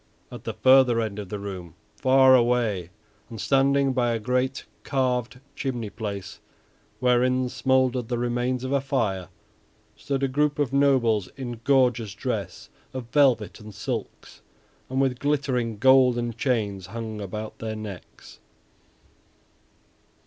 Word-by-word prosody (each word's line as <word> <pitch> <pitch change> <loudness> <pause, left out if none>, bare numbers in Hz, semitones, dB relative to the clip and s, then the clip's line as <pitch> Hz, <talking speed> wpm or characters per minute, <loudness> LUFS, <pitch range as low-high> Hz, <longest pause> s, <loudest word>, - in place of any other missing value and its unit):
At - - -10
the - - -4
further 130 -3 +5
end 110 -2 -3
of 100 -3 -7
the 105 - -4
room, 95 -5 -7 0.2
far 130 0 +5
away, 120 -8 +1 0.4
and 115 -2 -8
standing 135 +3 +2
by 120 -2 +1
a 115 - -1
great 125 +3 -1 0.2
carved 125 -2 -1 0.2
chimney 120 -6 -3
place 100 -4 -6 0.6
wherein 125 0 +2
smouldered 130 -2 +1
the 120 0 -2
remains 120 +1 -1
of 130 - -3
a 140 -1 +2
fire, 105 -10 -1 0.7
stood 140 -1 -3
a - - +3
group 145 +2 0
of 140 -3 -1
nobles 125 -8 +2
in 120 -4 -6
gorgeous 120 -6 +2
dress - - -4 0.2
of 120 -3 -6
velvet 130 -8 +2
and 105 -2 -11
silks, 115 0 -6 0.5
and 130 +1 -1
with 130 -2 +1
glittering 135 -6 -1
golden 125 -1 +4
chains 105 -7 -1
hung 110 0 -6
about 105 +2 -6
their 110 -1 -4
necks. 105 -4 -10
125 Hz, 135 wpm, -25 LUFS, 110-130 Hz, 0.7 s, further